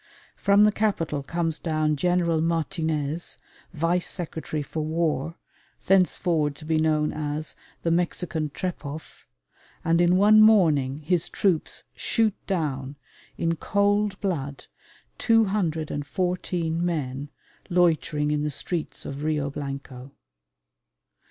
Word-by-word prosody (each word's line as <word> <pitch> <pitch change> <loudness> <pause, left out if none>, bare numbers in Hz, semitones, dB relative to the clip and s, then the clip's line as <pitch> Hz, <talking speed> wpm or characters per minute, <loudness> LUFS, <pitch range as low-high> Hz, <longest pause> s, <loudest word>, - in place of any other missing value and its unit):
From 200 +1 +4
the 210 - +6
capital 180 -9 0
comes 165 +2 -2
down 155 -2 0
General 170 0 +1
Martinez, 160 -1 -1 0.3
Vice 170 +2 0
Secretary 160 -3 -4
for 155 - -5
War, 160 -1 -1 0.5
thenceforward 175 -5 +2
to 155 - -11
be 160 0 +1
known 155 -1 +1
as 150 0 -4 0.3
"the 165 - +1
Mexican 170 -2 -1
Trepoff," 155 -2 -6 0.6
and 165 +1 +3
in 175 +1 +4
one 215 +2 +7
morning 155 -11 +5
his 170 +2 +1
troops 180 -6 0
shoot 225 -3 +1
down 145 -7 -2 0.4
in 165 0 0
cold 205 +2 +1
blood 145 -9 -3 0.5
214 175 -4 0
men 145 -5 -2 0.4
loitering 160 -4 +2
in 150 -1 0
the 150 - -1
streets 160 +3 -3
of 140 +2 -5
Rio 150 -2 0
Blanco. 135 -2 -7
160 Hz, 110 wpm, -25 LUFS, 150-180 Hz, 0.6 s, one